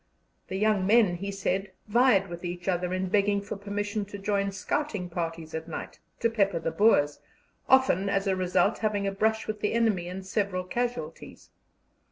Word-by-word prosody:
The 190 Hz, -, -5 dB
young 205 Hz, -1 st, +2 dB
men, 210 Hz, -5 st, +4 dB
he 200 Hz, +3 st, -4 dB
said, 195 Hz, 0 st, -2 dB
vied 220 Hz, -3 st, +4 dB
with 175 Hz, 0 st, -8 dB
each 175 Hz, 0 st, -5 dB
other 180 Hz, -1 st, 0 dB
in 185 Hz, 0 st, -1 dB
begging 200 Hz, 0 st, +2 dB
for 200 Hz, +1 st, -6 dB
permission 205 Hz, +1 st, -3 dB
to 205 Hz, 0 st, -8 dB
join 200 Hz, 0 st, 0 dB
scouting 195 Hz, -2 st, -2 dB
parties 165 Hz, -2 st, -4 dB
at 160 Hz, 0 st, -4 dB
night, -, -, -7 dB, 0.2 s
to 230 Hz, -, +4 dB
pepper 200 Hz, -5 st, +2 dB
the 165 Hz, 0 st, -2 dB
Boers, 155 Hz, -9 st, +3 dB, 0.5 s
often, 260 Hz, -8 st, +4 dB
as 195 Hz, 0 st, +1 dB
a 195 Hz, -1 st, +1 dB
result, 185 Hz, +3 st, +1 dB
having 210 Hz, -2 st, 0 dB
a 195 Hz, -, 0 dB
brush 220 Hz, +3 st, 0 dB
with 215 Hz, -1 st, -4 dB
the 210 Hz, -, 0 dB
enemy 220 Hz, -7 st, +1 dB
and 185 Hz, +1 st, -6 dB
several 190 Hz, -2 st, -1 dB
casualties. 210 Hz, -5 st, -5 dB
195 Hz, 180 wpm, -28 LUFS, 180-210 Hz, 0.5 s, men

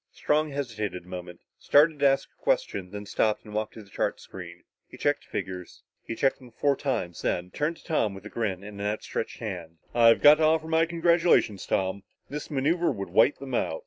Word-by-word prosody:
Strong 155 Hz, +1 st, +1 dB
hesitated 110 Hz, -10 st, -4 dB
a -, -, -19 dB
moment, 90 Hz, -1 st, -8 dB, 0.2 s
started 150 Hz, +1 st, +4 dB
to 140 Hz, -, +5 dB
ask 135 Hz, 0 st, +2 dB
a -, -, -39 dB
question, -, -, 0 dB
then 105 Hz, +1 st, -7 dB
stopped 105 Hz, +2 st, 0 dB
and 105 Hz, -, -10 dB
walked 110 Hz, 0 st, -2 dB
to 110 Hz, -, -9 dB
the 100 Hz, -, -20 dB
chart -, -, -1 dB
screen. 85 Hz, -2 st, -10 dB, 0.2 s
He -, -, -13 dB
checked -, -, 0 dB
the -, -, -28 dB
figures. 90 Hz, -2 st, -6 dB, 0.2 s
He 115 Hz, -, -6 dB
checked 135 Hz, +3 st, +1 dB
them 125 Hz, -2 st, -14 dB
four 140 Hz, +4 st, +1 dB
times, 120 Hz, -, -3 dB
then 90 Hz, +1 st, -1 dB
turned 155 Hz, -, -1 dB
to -, -, -19 dB
Tom 110 Hz, -11 st, 0 dB
with 95 Hz, +1 st, -11 dB
a -, -, -7 dB
grin 100 Hz, -5 st, -2 dB
and 100 Hz, -1 st, -8 dB
an 100 Hz, -, -1 dB
outstretched 105 Hz, +1 st, -3 dB
hand. 90 Hz, -7 st, -6 dB, 0.2 s
"I've 115 Hz, -1 st, +5 dB
got 150 Hz, +1 st, +9 dB
to -, -, +2 dB
offer 160 Hz, 0 st, +3 dB
my 160 Hz, +1 st, +3 dB
congratulations, 170 Hz, -, +2 dB
Tom. 95 Hz, +1 st, 0 dB, 0.3 s
This 150 Hz, +1 st, -6 dB
maneuver 160 Hz, +5 st, +1 dB
would 100 Hz, -2 st, -5 dB
wipe 110 Hz, +10 st, +4 dB
them 135 Hz, -2 st, -8 dB
out. 80 Hz, -8 st, 0 dB
115 Hz, 215 wpm, -27 LUFS, 95-150 Hz, 0.3 s, got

